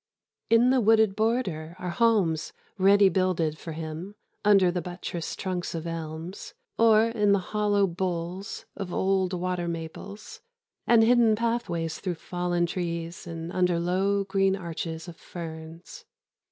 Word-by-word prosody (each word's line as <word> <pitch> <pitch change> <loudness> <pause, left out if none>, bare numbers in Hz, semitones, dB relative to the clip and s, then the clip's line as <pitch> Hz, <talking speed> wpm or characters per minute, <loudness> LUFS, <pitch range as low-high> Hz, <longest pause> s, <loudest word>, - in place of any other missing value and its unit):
In 235 +2 +5
the 260 -1 +3
wooded 220 -2 +4
border 200 -8 -1
are 180 -1 -4
homes 195 -8 +2 0.3
ready 200 +1 +6
builded 175 -4 0
for 165 - -7
him 160 +5 -6 0.3
under 195 -4 +5
the 180 0 -2
buttressed 175 -1 -5
trunks 180 -2 -3
of 165 0 -4
elms, 165 +2 -6 0.2
or 225 0 +5
in 210 -3 +2
the - - +4 0.2
hollow 205 -1 +3
boles 180 +1 -4
of 195 -3 -5
old 190 0 +1
water 180 -1 -2
maples, 170 +5 -7 0.5
and 230 -1 +6
hidden 230 -1 +5
pathways 210 -8 -2
through 180 -3 -3
fallen 175 +1 -1
trees 170 -1 -4
and 165 0 -6
under 180 -2 +1
low 190 +3 +1
green 195 0 +1
arches 165 -2 -5
of 170 -1 -9
ferns. 165 - -9
180 Hz, 140 wpm, -27 LUFS, 170-205 Hz, 0.5 s, ready